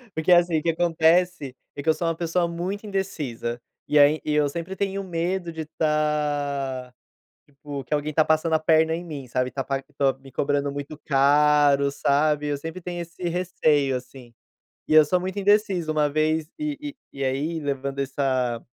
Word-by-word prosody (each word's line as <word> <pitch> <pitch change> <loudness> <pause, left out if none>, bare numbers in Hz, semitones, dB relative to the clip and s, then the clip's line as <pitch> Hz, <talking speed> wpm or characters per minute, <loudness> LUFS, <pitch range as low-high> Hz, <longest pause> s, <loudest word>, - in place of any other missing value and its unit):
Porque 160 +3 +1
assim, 175 -2 +5
o - - -8
que 170 - +1
acontece 165 -2 +2 0.2
é 140 - -6
que 160 - 0
eu - - +6
sou 165 +2 -3
uma 165 - 0
pessoa 170 +1 0
muito 180 +5 -4
indecisa, 140 - -3 0.3
e 150 - +4
aí 145 +2 +5
e 150 - -1
eu 150 -1 +3
sempre 170 +5 -5
tenho 195 0 -2
medo 175 0 -2
de 160 - -6
estar, 145 -4 -1 0.5
tipo, 145 -1 -8
que 140 - -4
alguém 150 +1 -1
está 155 +1 +3
passando 160 +1 +1
a 160 - +4
perna 160 0 +3
em 175 - -6
mim, 145 -6 -7
sabe, 125 +1 -1
está 135 0 -4
par 135 -1 -2
tô 135 -2 +3
me 135 -1 -15
cobrando 140 +1 0
muito 145 +2 -6
caro, 140 0 +4
sabe, 150 +1 +1
eu 145 -1 -1
sempre 165 +5 -7
tenho 175 0 -5
esse 170 +2 -10
receio, 155 -6 +1
assim. 125 -1 -13 0.5
E - - +1
eu 155 - +9
sou 180 +4 +1
muito 185 +2 -4
indeciso, 200 -5 +2
uma 150 -1 +2
vez 155 +1 0
e 295 -1 -4 0.2
e 135 0 -5
aí, 145 +5 -1
levando 140 -1 -3
essa 130 -3 -1
155 Hz, 185 wpm, -24 LUFS, 140-170 Hz, 0.5 s, eu